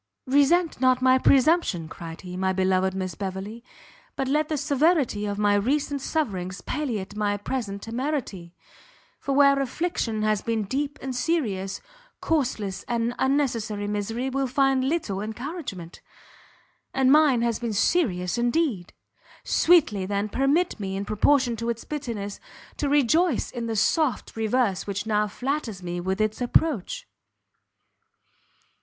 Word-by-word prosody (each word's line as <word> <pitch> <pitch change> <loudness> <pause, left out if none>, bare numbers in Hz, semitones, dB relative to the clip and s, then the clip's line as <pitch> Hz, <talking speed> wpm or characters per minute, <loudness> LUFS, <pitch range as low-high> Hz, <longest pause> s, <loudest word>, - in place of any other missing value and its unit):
"Resent 285 +4 +3
not 255 -1 +4
my 260 0 +5
presumption," 265 - +3
cried 165 0 -9
he, 180 -1 -8
"my 190 0 0
beloved 190 0 +1
Miss 185 -1 -3
Beverley, 200 +4 -6 0.5
but 270 - -2
let 300 +3 +1
the 310 - 0
severity 285 -7 +1
of 200 0 -3
my 205 0 +3
recent 275 +7 0
sufferings 195 - -2
palliate 215 -9 -3
my 205 -1 0
present 205 -2 -4
temerity; 230 - -4 0.6
for 275 - -2
where 280 0 +5
affliction 250 -6 -2
has 215 -1 +1
been 225 -2 -1
deep 280 +7 -3
and 265 -1 -4
serious, 225 - -1 0.4
causeless 245 -11 -1
and 235 0 0
unnecessary 230 -7 0
misery 210 +5 -2
will 270 0 0
find 265 0 +2
little 225 - -2
encouragement; 220 - -6 0.9
and 265 -1 +4
mine 290 -5 +5
has 235 -2 0
been 235 -2 -3
serious 205 - +1
indeed! 240 - 0 0.5
Sweetly, 250 - +3
then, 200 +1 -1
permit 280 - +1
me, 195 -1 -3
in 200 - -3
proportion 245 +4 +2
to 230 +1 -3
its 230 -1 -3
bitterness, 230 -9 -5 0.4
to 290 - -1
rejoice 295 +2 +2
in 235 -2 -4
the 225 - -2
soft 265 +3 +1
reverse 225 -3 0
which 200 0 -3
now 210 -1 +1
flatters 235 -3 -3
me 175 0 -3
with 190 +2 -2
its 215 +2 0
approach." 315 - 0
235 Hz, 135 wpm, -25 LUFS, 200-280 Hz, 0.9 s, my